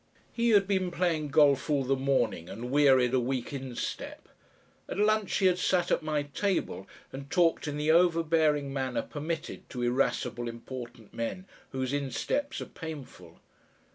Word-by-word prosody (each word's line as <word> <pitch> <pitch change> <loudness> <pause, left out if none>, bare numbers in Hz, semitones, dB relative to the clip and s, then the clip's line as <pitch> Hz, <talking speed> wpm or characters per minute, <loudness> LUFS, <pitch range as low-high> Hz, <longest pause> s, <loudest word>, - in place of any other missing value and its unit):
He 235 0 +1
had 200 -3 +5
been 190 -2 +1
playing 170 -3 0
golf 145 -1 +4
all 145 -2 +2
the 135 +1 +1
morning 130 -10 0
and 120 +5 -6
wearied 135 -3 +5
a 130 - +4
weak 125 +1 -2
instep; 130 -3 -5 0.6
at - - -4
lunch 215 -1 +2
he 195 - +2
had 180 -1 +4
sat 180 -1 +1
at - - +2
my 155 -2 -1
table 145 - -2 0.3
and 135 +1 -8
talked 170 -3 +2
in 145 0 -3
the 150 +1 +2
overbearing 160 -4 +3
manner 130 -2 -1
permitted 160 +2 -5
to 125 -1 -4
irascible 120 -1 0
important 120 -1 -9
men 115 +11 -4 0.2
whose 130 0 -3
insteps 145 - -2
are - - -4
painful. 160 -5 -10
145 Hz, 155 wpm, -29 LUFS, 130-170 Hz, 0.6 s, had